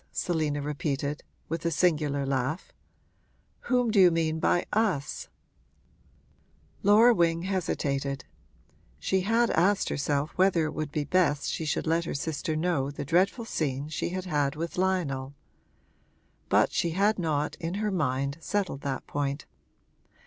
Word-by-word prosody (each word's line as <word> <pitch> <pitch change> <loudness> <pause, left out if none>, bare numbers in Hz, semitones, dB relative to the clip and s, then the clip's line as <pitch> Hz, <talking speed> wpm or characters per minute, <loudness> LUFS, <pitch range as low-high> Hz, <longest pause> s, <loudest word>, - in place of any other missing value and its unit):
Selina 155 -4 -1
repeated, 145 0 -2 0.3
with 165 +1 -3
a 170 - +1
singular 150 -4 +1
laugh. 135 +4 -2 0.9
'Whom 245 -3 +2
do 210 - +3
you 185 -2 +8
mean 160 -1 0
by 175 - +2
us?' 195 -11 0 1.5
Laura 220 +4 +6
Wing 170 -3 +2
hesitated; 140 -8 -2 0.7
she 185 - 0
had 230 +4 +2
asked 195 +5 +2
herself 145 +1 -1
whether 185 -3 +3
it 155 - -3
would 155 -2 -4
be 150 0 -1
best 150 -2 +1
she 160 - -3
should 150 - -1
let 165 +1 +1
her - - -4
sister 155 +1 -2
know 155 -4 0
the 145 0 -6
dreadful 190 - +2
scene 145 -7 -2
she 155 - -2
had 185 +1 -4
had 145 -5 0
with 165 +2 -4
Lionel; 150 -8 -1 1.1
but - - +4
she 170 - 0
had 205 +1 +3
not, 150 -4 -1
in 170 +1 -4
her 210 0 -1
mind, 140 -3 -1
settled 190 -9 -2
that 135 -2 -3
point. 140 0 -3
160 Hz, 140 wpm, -28 LUFS, 145-185 Hz, 1.5 s, you